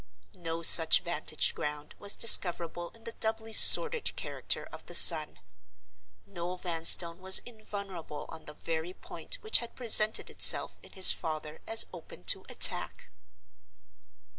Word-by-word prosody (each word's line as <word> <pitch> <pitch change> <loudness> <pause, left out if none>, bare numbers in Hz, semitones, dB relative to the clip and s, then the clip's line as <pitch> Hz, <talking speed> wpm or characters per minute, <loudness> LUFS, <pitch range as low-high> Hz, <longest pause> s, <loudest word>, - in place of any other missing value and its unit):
No 165 -1 -9
such 160 0 +5
vantage 155 -2 -6
ground 150 0 -10
was 205 0 0
discoverable 175 -5 0
in 225 - -25
the 230 - -10
doubly 225 0 -6
sordid 475 - +4
character - - -7
of - - -15
the - - -8
son. 155 - +6 0.9
Noel 175 - -11
Vanstone 170 0 0
was 190 0 +2
invulnerable 200 -9 -13
on 160 -1 -16
the 150 - -15
very 165 +3 -9
point - - -8
which 435 - -1
had 235 -1 -13
presented 220 -3 0
itself - - +2
in - - -20
his 190 -1 +4
father 155 -1 -9
as 225 0 0
open 165 - -16
to - - -2
attack. - - 0
175 Hz, 140 wpm, -25 LUFS, 160-220 Hz, 0.9 s, son